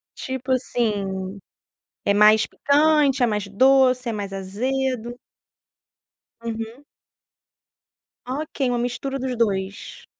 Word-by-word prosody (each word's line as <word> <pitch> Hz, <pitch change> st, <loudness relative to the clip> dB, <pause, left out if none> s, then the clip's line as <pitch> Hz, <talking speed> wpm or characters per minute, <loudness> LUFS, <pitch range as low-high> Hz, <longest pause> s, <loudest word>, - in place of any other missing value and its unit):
Tipo 260 Hz, 0 st, -4 dB
assim, 200 Hz, -6 st, -1 dB, 0.7 s
é 200 Hz, -, +3 dB
mais 210 Hz, +1 st, +5 dB
picante, 290 Hz, -2 st, +3 dB
é 245 Hz, -, +5 dB
mais 210 Hz, -2 st, -1 dB
doce, 255 Hz, +3 st, +4 dB
é -, -, -2 dB
mais 200 Hz, -2 st, -5 dB
azedo? 240 Hz, +5 st, -2 dB, 1.3 s
Uhum. 230 Hz, +3 st, -6 dB, 1.4 s
Ok, 270 Hz, 0 st, -2 dB
uma 245 Hz, -, 0 dB
mistura 245 Hz, +3 st, -3 dB
dos 255 Hz, -1 st, -3 dB
2. 195 Hz, -3 st, -2 dB
240 Hz, 100 wpm, -23 LUFS, 210-265 Hz, 1.4 s, mais